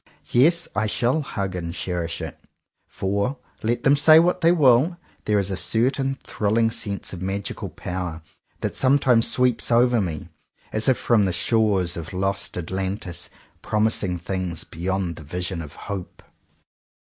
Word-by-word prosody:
Yes, 165 +8 +4
I 105 +1 +1
shall 125 +8 +1
hug 100 -9 -4
and 85 -1 -4
cherish 85 -2 -3
it; - - -7 0.5
for, 100 +8 -2 0.2
let 115 +2 -1
them 135 +1 +5
say 155 +2 +7
what 180 +2 +2
they 165 0 +5
will, 150 +1 +4 0.3
there 105 -1 +2
is 100 -1 0
a - - -1
certain 135 +7 0
thrilling 115 +2 +1
sense 100 -4 -3
of 90 - -7
magical 95 +2 -3
power 90 -3 -5 0.4
that - - -2
sometimes 130 -3 +4
sweeps 125 -2 +2
over 120 -1 +4
me, 80 -6 -4 0.4
as 110 +4 +1
if 130 - +3
from 110 -4 +3
the 95 - 0
shores 95 -1 +1
of 85 +2 -7
Lost 95 0 -1
Atlantis, 95 +1 -3 0.3
promising 105 -4 +1
things 90 -1 -3
beyond 90 +1 -3
the 80 - -9
vision 90 +3 -4
of 75 -2 -9
hope. 100 -3 -7
100 Hz, 150 wpm, -23 LUFS, 90-125 Hz, 0.5 s, say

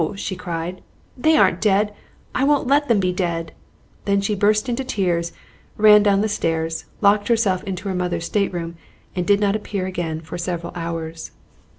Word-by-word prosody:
she 195 -1 -4
cried; 175 0 -5 0.3
"they 315 +5 +3
aren't 185 -3 +3
dead! 205 0 +2 0.4
I 255 - 0
won't 285 0 +3
let 285 +3 +3
them 230 -4 +3
be 185 -1 +1
dead!" 170 -3 -2 0.5
Then 200 0 +2
she 200 +2 -1
burst 210 +3 +2
into 245 +2 -1
tears, 175 -8 -1 0.5
ran 210 0 +7
down 200 -1 +3
the 215 - +1
stairs, 165 -5 -2 0.2
locked 205 0 +4
herself 220 -6 +2
into 190 0 -5
her 190 - -1
mother's 180 -2 -2
stateroom, 175 -5 -2 0.4
and 180 -1 -2
did 200 0 +4
not 205 -1 +2
appear 205 -3 -3
again 175 -4 -3
for 165 +2 -8
several 170 -1 -4
hours. 165 -1 -5
190 Hz, 175 wpm, -21 LUFS, 170-210 Hz, 0.5 s, ran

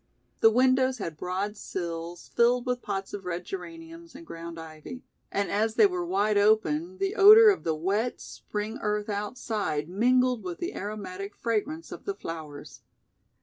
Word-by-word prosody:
The 225 - +7
windows 255 +2 +3
had 170 -7 -5
broad 190 +6 -3
sills 170 -3 -6
filled 240 +1 +3
with 250 -1 -1
pots 195 0 -4
of 205 -1 -5
red 180 0 -4
geraniums 330 -3 -9
and 330 +4 -11
ground 165 - -8
ivy, 160 +10 -9 0.3
and 200 0 -1
as 220 +2 0
they 425 - +6
were 365 -3 0
wide 215 - +1
open 295 - +2
the 390 +1 -1
odor 430 +1 +9
of 390 - -3
the 160 -1 0
wet, 200 +9 -1
spring 210 +3 -6
earth 210 0 -1
outside 205 -7 -2
mingled 250 +5 +2
with 180 -2 -5
the 350 - -4
aromatic 200 -1 -6
fragrance 255 +9 -2
of - - -9
the 400 - -2
flowers. 155 - -8
215 Hz, 160 wpm, -27 LUFS, 185-260 Hz, 0.3 s, odor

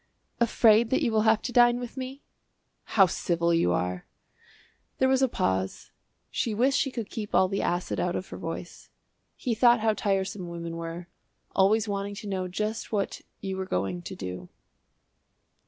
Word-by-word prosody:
"Afraid 225 -1 +5
that 260 - +1
you 235 - +2
will 220 0 +3
have 220 -1 +3
to - - -3
dine 240 0 +5
with 245 -1 -7
me?" 265 +1 -6 0.7
"How 195 - +9
civil 170 -1 0
you 165 - +3
are!" 90 0 -2 0.9
There 260 - +3
was 265 0 +3
a 265 - +5
pause. 95 - -2 0.4
She 225 -3 -1
wished 255 +5 +3
she 275 - +1
could 230 -5 -5
keep 210 -3 -4
all 190 - +5
the 195 +1 -2
acid 175 +1 -1
out 180 0 0
of 185 - -4
her - - -7
voice. 165 +1 -7 0.5
He 245 - -2
thought 240 +1 +5
how 220 0 +3
tiresome 195 -3 -1
women 170 -1 -5
were, 165 +1 -6 0.5
always 210 +3 +4
wanting 200 0 -3
to 210 +1 -8
know 190 -2 -2
just 215 +4 -3
what 200 -3 -1 0.2
you 195 -1 -3
were 190 0 -3
going 90 - -2
to - - -7
do. 90 -1 -7
200 Hz, 175 wpm, -27 LUFS, 170-230 Hz, 0.9 s, How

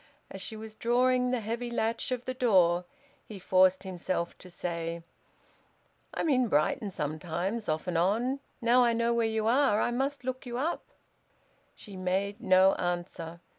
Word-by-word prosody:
As 195 - -7
she 215 +4 -5
was 220 0 -8
drawing 250 +2 +2
the 250 -2 0
heavy 230 +3 -3
latch 230 +1 -1
of 250 -1 -2
the 255 - -2
door 180 -8 +3 0.4
he 210 - -10
forced 185 0 +3
himself 180 -2 -3
to 185 - -12
say, 170 -1 -4 1.1
"I'm - - -1
in 255 -5 +3
Brighton 175 +5 +1
sometimes, 175 +7 -3
off 155 0 -1
and 175 -2 0
on. 235 +10 +1 0.2
Now 240 +2 +5
I 235 -1 +3
know 235 +1 +1
where 230 -1 +2
you 220 -1 -1
are, 240 -2 +3
I 240 - +1
must 270 +2 -2
look 255 0 -4
you 240 -2 -5
up." 310 +7 -1 0.9
She 205 - -11
made 190 +2 -2
no 185 +1 +5
answer. 175 -1 -4
215 Hz, 165 wpm, -29 LUFS, 180-245 Hz, 1.1 s, Now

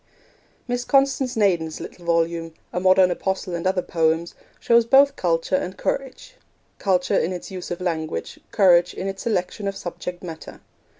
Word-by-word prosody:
Miss 245 0 -1
Constance 270 -1 +2
Naden's 175 -7 +1
little 175 - -9
volume, 165 -1 0 0.2
A 180 - 0
Modern 185 0 +5
Apostle 190 0 -2
and 170 +1 -2
Other 185 -1 +1
Poems, 165 0 0 0.3
shows 235 0 +4
both 275 +4 +5
culture 170 -2 0
and 185 +1 -3
courage 275 - -4 0.4
culture 180 -2 +2
in 175 - -1
its 180 +1 -6
use 185 -1 -6
of 175 - -4
language, 165 -3 -3
courage 180 -5 +4
in 185 - -5
its 195 0 -5
selection 200 -2 -2
of 195 - -2
subject 175 0 -6
matter. 160 -3 -9
185 Hz, 160 wpm, -23 LUFS, 170-210 Hz, 0.4 s, Modern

